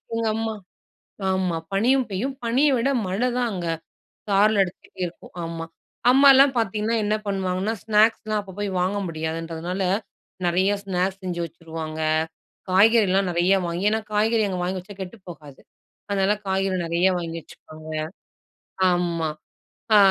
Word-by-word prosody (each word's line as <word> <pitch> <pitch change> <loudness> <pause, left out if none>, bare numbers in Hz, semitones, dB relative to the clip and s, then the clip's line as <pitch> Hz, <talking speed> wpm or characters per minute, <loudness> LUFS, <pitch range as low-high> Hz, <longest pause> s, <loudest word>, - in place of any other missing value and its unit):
எங்க 230 0 0
அம்மா 225 0 -2 0.8
ஆமா. 185 -3 0 0.2
பனியும் 250 +6 +3
பெய்யும். 235 +9 -2
பனிய 255 +6 +3
விட 250 +4 +1 0.2
மழ 185 +2 -2 0.2
தான் 245 -1 +1
அங்க 180 -3 -4 0.6
சாரல் 205 +1 +4
அடிச்சிட்டே 185 0 -5
இருக்கும் 170 - -13
ஆமா. 165 0 -5 0.5
அம்மாலாம் 275 0 +7
பார்த்தீங்கன்னா, 220 +1 0
என்ன 210 +1 +1
பண்ணுவாங்கன்னா 190 +2 -1
ஸ்நாக்ஸ்லாம் 215 0 +2
அப்ப 190 -2 -11
போய் 205 - -1
வாங்க 185 +3 0
முடியாதுன்றதுனால, 165 +3 -3 0.6
நிறைய 185 +3 +2
ஸ்நாக்ஸ் 190 0 -1
செஞ்சு 175 -2 -3
வச்சுருவாங்க. 160 -1 -7 0.7
காய்கறிலாம் 195 -1 +4
நிறையா 175 +3 +3
வாங்கி 175 +4 -2
ஏன்னா 220 +1 +1
காய்கறி 220 +1 +2
அங்க 185 -2 -3
வாங்கி 185 +1 -1
வச்சா 200 +3 -11
கெட்டு 190 +4 -7
போகாது. 150 -5 -11 0.5
அதனால 195 0 +2
காய்கறி 190 0 0
நிறையா 170 +3 +2
வாங்கி 165 -1 -5
வச்சுப்பாங்க. 155 0 -13 1.0
ஆமா. 170 -3 0 0.7
ஆ - - +8
190 Hz, 130 wpm, -24 LUFS, 175-215 Hz, 1.0 s, ஆ